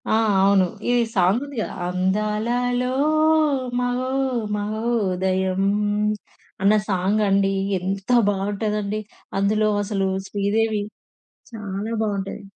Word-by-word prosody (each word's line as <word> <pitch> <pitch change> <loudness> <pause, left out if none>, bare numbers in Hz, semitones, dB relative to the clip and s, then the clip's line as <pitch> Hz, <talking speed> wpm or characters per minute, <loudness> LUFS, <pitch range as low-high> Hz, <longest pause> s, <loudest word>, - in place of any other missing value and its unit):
ఆ! - - +1 0.3
అవును. 195 -1 +4 0.3
ఈ - - +3 0.2
సాంగ్ 190 +5 +3
ఉంది 285 -1 -10
కదా! - - -4
అందాలలో 215 +7 0 0.9
మహో 250 +1 -1 0.5
మహోదయం 195 -4 0 1.0
అన్న 200 +2 +5 0.2
సాంగ్ 195 +3 +1
అండి. 195 0 +2 0.3
ఎంత 195 +3 -4 0.2
బావుంటదండి. 205 +1 -2 0.4
అందులో 215 +2 +2
అసలు 195 -2 -1 0.2
'శ్రీదేవి' 210 +1 0 0.7
చాలా 210 -1 -5
బావుంటది. 200 -1 -3
205 Hz, 90 wpm, -22 LUFS, 195-215 Hz, 1.0 s, అన్న